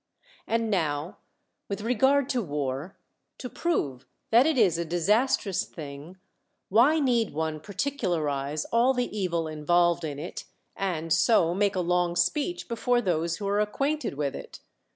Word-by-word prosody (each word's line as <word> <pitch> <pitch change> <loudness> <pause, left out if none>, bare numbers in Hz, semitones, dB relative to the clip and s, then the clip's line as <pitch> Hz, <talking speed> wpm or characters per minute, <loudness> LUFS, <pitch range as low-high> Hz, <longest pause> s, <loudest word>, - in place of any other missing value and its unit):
And 230 -1 0
now 155 -2 -1 0.5
with 200 +1 -4
rea'ard 265 +4 +3
to 255 -3 0
war, 145 - -4 0.4
to 250 - -6
prove 145 - -2 0.2
that 240 +5 +6
it 315 -4 +1
is 185 -8 +3
a - - 0
disas 195 +10 +2
trous 195 -4 -3
thincf, 145 +3 -9 0.5
why 255 +10 +5
need 240 - +1
one 160 0 -2
particularize 160 - -2
all 245 +3 +3
the 245 -3 -2
evil 170 -5 -1
involved 170 +3 +2
in 145 -3 -4
it, 155 +4 -7 0.3
and 165 -5 -1
so 175 -7 +3
juake 200 +1 +1
a 180 -2 -1
Ions,' 175 0 +2
speech 300 - -3
before 240 +1 +1
those 170 -5 -1
who 200 - -4
are 200 +1 +1
acquainted 275 - -1
with 140 -1 -2
it? - - -9
185 Hz, 150 wpm, -27 LUFS, 160-235 Hz, 0.5 s, that